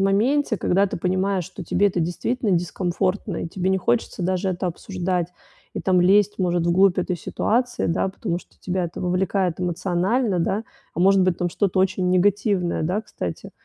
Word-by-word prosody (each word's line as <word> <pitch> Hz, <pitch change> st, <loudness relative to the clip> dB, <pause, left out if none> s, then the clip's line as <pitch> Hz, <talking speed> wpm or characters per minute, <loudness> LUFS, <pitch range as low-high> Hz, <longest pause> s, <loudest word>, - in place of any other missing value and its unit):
моменте, 220 Hz, +6 st, +2 dB
когда 195 Hz, +2 st, +2 dB
ты -, -, -4 dB
понимаешь, 185 Hz, +1 st, 0 dB
что 190 Hz, -, -9 dB
тебе 205 Hz, +5 st, +2 dB
это 180 Hz, -2 st, -2 dB
действительно 205 Hz, +7 st, -1 dB
дискомфортно, 180 Hz, +2 st, -1 dB
и -, -, -5 dB
тебе 185 Hz, +1 st, -1 dB
не 190 Hz, -, +2 dB
хочется 235 Hz, -1 st, -1 dB
даже 185 Hz, +1 st, 0 dB
это 180 Hz, 0 st, -2 dB
обсуждать, 180 Hz, 0 st, -2 dB, 0.5 s
и -, -, -3 dB
там 185 Hz, -1 st, +3 dB
лезть, 200 Hz, +3 st, +4 dB
может, 175 Hz, -2 st, +1 dB
в 170 Hz, -, +3 dB
глубь 190 Hz, +1 st, +4 dB
этой 180 Hz, 0 st, -1 dB
ситуации, 245 Hz, +8 st, -1 dB
да, 165 Hz, +3 st, 0 dB
потому 190 Hz, -2 st, -3 dB
что -, -, -24 dB
тебя 185 Hz, 0 st, -2 dB
это 170 Hz, -, -6 dB
вовлекает 180 Hz, 0 st, 0 dB
эмоционально, 180 Hz, +4 st, 0 dB
да. 200 Hz, +6 st, -1 dB, 0.3 s
А, -, -, -6 dB
может 195 Hz, +1 st, +5 dB
быть, 185 Hz, -2 st, +1 dB
там 175 Hz, -, 0 dB
что-то 195 Hz, +1 st, 0 dB
очень 185 Hz, -1 st, +1 dB
негативное, 190 Hz, -1 st, +1 dB
да, 180 Hz, +7 st, 0 dB
кстати, 90 Hz, -, -6 dB
185 Hz, 180 wpm, -23 LUFS, 175-200 Hz, 0.5 s, может